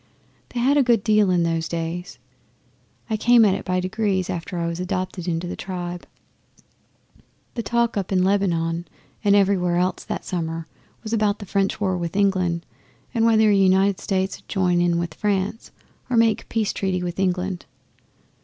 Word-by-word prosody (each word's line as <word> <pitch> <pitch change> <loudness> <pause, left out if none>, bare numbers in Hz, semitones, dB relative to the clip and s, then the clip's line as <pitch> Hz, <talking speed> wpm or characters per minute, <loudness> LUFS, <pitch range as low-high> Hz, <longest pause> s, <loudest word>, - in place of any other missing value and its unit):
They 245 - -4
had 270 +4 +3
a - - +6
good 235 -5 +3
deal 215 -3 +3
in 175 -2 +3
those 165 -1 0
days. 170 +1 -4 0.9
I 220 - -1
came 235 +1 +5
at 195 - +4
it 195 - -3
by 185 0 0
degrees, 190 0 -1
after 175 +1 -5
I 170 - -1
was 170 +1 -3
adopted 185 -1 -3
into 170 0 -1
the 175 - -4
tribe. 175 -2 -6 1.5
The 235 - -3
talk 235 +1 0
up 195 -1 -2
in 185 -1 +3
Lebanon 175 -4 0 0.4
and 200 -1 +4
everywhere 190 -3 +3
else 180 +1 0
that - - -4
summer 165 -2 -3 0.4
was 220 0 -4
about 210 -2 +2
the 205 - -9
French 195 +2 0
war 190 -3 0
with 170 0 -4
England 185 -4 +1 0.5
and 230 -2 +2
whether 220 -1 +5
the 205 - +4
United 190 0 +3
States 190 -1 -1
'ud - - -26
join 180 -3 +1
in 175 -1 +2
with 170 -2 -2
France 205 +3 -2 0.4
or 245 - +1
make 225 -1 +3
a - - -18
peace 220 -3 -1
treaty 185 -2 -1
with 175 +1 -4
England. 185 -1 -1
190 Hz, 180 wpm, -23 LUFS, 175-205 Hz, 1.5 s, a